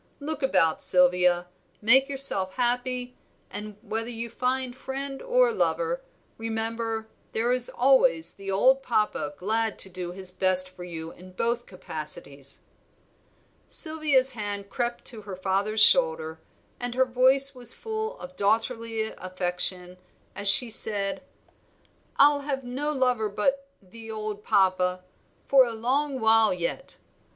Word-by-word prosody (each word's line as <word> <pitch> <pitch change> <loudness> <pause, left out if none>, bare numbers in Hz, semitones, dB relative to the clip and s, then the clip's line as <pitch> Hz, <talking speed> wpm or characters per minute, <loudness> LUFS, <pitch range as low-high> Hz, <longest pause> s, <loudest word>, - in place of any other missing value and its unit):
Look 300 +1 -4
about, 185 - +2
Sylvia, 180 -1 +4 0.3
make 265 +6 +4
yourself 265 -9 +1
happy; 250 0 -1 0.4
and, 210 0 -8
whether 225 +2 -3
you 235 -1 -6
find 255 0 -2
friend 270 +1 -6
or - - +2
lover, 485 +2 -1 0.4
remember 225 0 -3 0.3
there 235 +2 0
is 250 -1 +5
always 260 -10 +2
the 195 0 -9
old 255 +8 +3
Papa 210 -5 -2
glad 220 +3 -1
to 190 - +3
do 175 -1 -6
his 185 0 -3
best 185 0 +1
for 180 -1 -11
you 165 -2 -8
in 185 +1 -15
both 235 +5 -2
capacities." 150 -6 -5 1.1
Sylvia's 305 -5 +3
hand 205 -3 -6
crept 240 -1 -3
to 225 -3 -8
her 200 -2 -8
father's 195 +3 -1
shoulder, 160 -10 +3 0.4
and 245 0 -4
her 260 0 +3
voice 260 +2 +5
was 245 -2 +1
full 440 +1 -5
of 270 +1 -11
daughterly 225 +1 -1 0.2
affection, 180 0 -2 0.4
as 205 - -4
she 230 +4 +7
said 205 -2 +2 0.9
"I'll 290 0 +5
have 275 -2 -4
no 265 +5 -3
lover 250 -6 0
but 275 +7 -1 0.2
'the 225 +4 -13
old 215 -1 -6
Papa' 185 -1 +1 0.4
for 270 -1 +5
a 235 -2 -3
long 265 +5 -1
while 220 -3 +4
yet. 180 +10 -5
225 Hz, 135 wpm, -25 LUFS, 190-260 Hz, 1.1 s, she